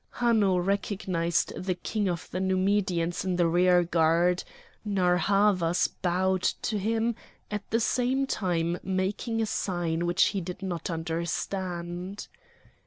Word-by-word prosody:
Hanno 220 -6 +3
recognised 180 -2 0
the 185 0 -2
king 205 +3 -2
of 170 -2 -4
the 185 - -2
Numidians 185 -2 +1
in 185 -1 -1
the 175 -1 +3
rearguard; 175 0 +3 0.4
Narr' 185 -4 +2
Havas 185 -2 +2
bowed 185 +1 0
to 210 +3 -1
him, 225 +3 0 0.4
at 210 -1 -4
the 230 - +2
same 250 +4 +1
time 175 -7 -1
making 200 +5 -1
a - - +1
sign 175 -5 -1
which 175 +2 +3
he 195 - -2
did 180 +2 -7
not 175 -3 -3
understand. 175 +2 -3
185 Hz, 125 wpm, -28 LUFS, 175-200 Hz, 0.4 s, Hanno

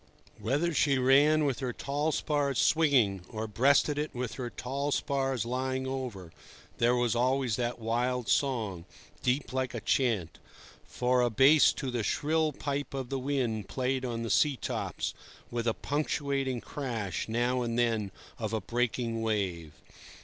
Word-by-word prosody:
Whether 145 +9 0
she 140 -2 +3
ran 145 +4 +5
with 135 -4 0
her 125 -2 -2
tall 145 +5 -1
spars 145 -3 0
swinging, 130 - +3
or 110 0 -4
breasted 140 +6 +3
it 150 -2 -3
with 125 -2 -3
her 125 -2 -4
tall 140 +4 -3
spars 135 -5 0
lying 130 +2 -2
over, 125 -10 -5 0.5
there 120 +1 +4
was 120 -2 +1
always 130 -1 +1
that 120 0 -1
wild 120 +2 -1
song, 110 -11 0 0.4
deep 130 +1 0
like 130 -2 -1
a - - -2
chant, 105 -6 0 0.5
for 125 0 +1
a 120 - +3
bass 135 +7 +6
to 130 - -4
the 120 -1 -1
shrill 155 +7 +1
pipe 140 0 -4
of 130 -2 -4
the 135 - -2
wind 125 -6 -1
played 130 0 -1
on 115 -2 -3
the 115 - -2
sea 145 -4 +3
tops, - - -3 0.4
with 120 0 -2
a 115 - +3
punctuating 140 -3 -1
crash, 115 -9 -4
now 120 +2 +1
and 115 -1 -2
then, 115 -4 +1 0.3
of 110 -1 -3
a 110 - +1
breaking 120 -1 -1
wave. 95 -8 -1
125 Hz, 155 wpm, -30 LUFS, 115-140 Hz, 0.5 s, bass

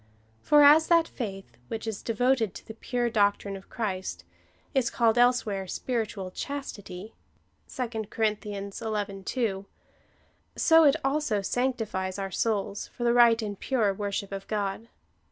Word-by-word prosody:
For 295 0 +6
as 305 +2 +7
that 335 -1 +4
faith, 195 -6 -7
which 225 -1 -5
is 220 -3 -4
devoted 230 -2 +1
to - - -10
the 220 - -7
pure 240 +2 -2
doc 205 -2 +3
trine 200 -1 -6
of 195 - -12
Christ, 190 -5 -4 0.5
is 265 -4 +2
called 230 -2 +2
elsewhere 240 -6 +2
spiritual 210 -4 -3
chastity, 210 -7 -6 0.6
(2 230 -4 -4
Cor. 225 - 0 0.2
xi. 205 0 -4
2,) 200 -6 -1 0.9
so 325 0 +6
it 285 0 +6
also 270 -7 0
sanctifies 215 -6 -1
our 195 -1 -4
souls 205 -1 -1
for 240 - -7
the 235 0 +3
right 235 -1 +6
and 205 -2 -5
pure 225 -7 +1
worship 200 0 -3
of 195 0 -6
God. 205 +1 -2
220 Hz, 145 wpm, -27 LUFS, 200-245 Hz, 0.9 s, as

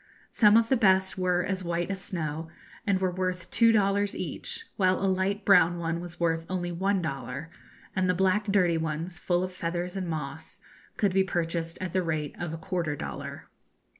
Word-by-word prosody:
Some 210 -1 +6
of 230 0 +3
the 265 - +5
best 190 -4 +3
were 180 -1 +1
as 190 0 -2
white 170 +2 -1
as 190 -1 -4
snow, 160 -4 -4 0.4
and 195 -2 +3
were 185 -1 +1
worth 185 0 -3
two 230 0 +5
dollars 200 -1 +2
each, 455 - -4
while 185 -1 +2
a 195 - 0
light 195 +2 0
brown 175 -3 +6
one 165 0 -2
was 175 -1 -8
worth 165 -1 +1
only 175 -1 -2
one 190 +2 0
dollar, 140 +1 -5 0.4
and 185 -1 +1
the 180 - +3
black 190 +3 +2
dirty 180 -5 +3
ones, 160 +3 -3
full 175 0 +1
of 185 0 -4
feathers 175 +1 -3
and 190 -2 -3
moss, 160 -1 -5 0.4
could 200 -3 +2
be 190 0 +4
purchased 165 -2 -2
at 185 -2 -3
the 185 - +1
rate 155 -4 -2
of 175 -2 -3
a 165 - -4
quarter 165 -3 -2
dollar. - - -6
180 Hz, 195 wpm, -28 LUFS, 165-190 Hz, 0.4 s, Some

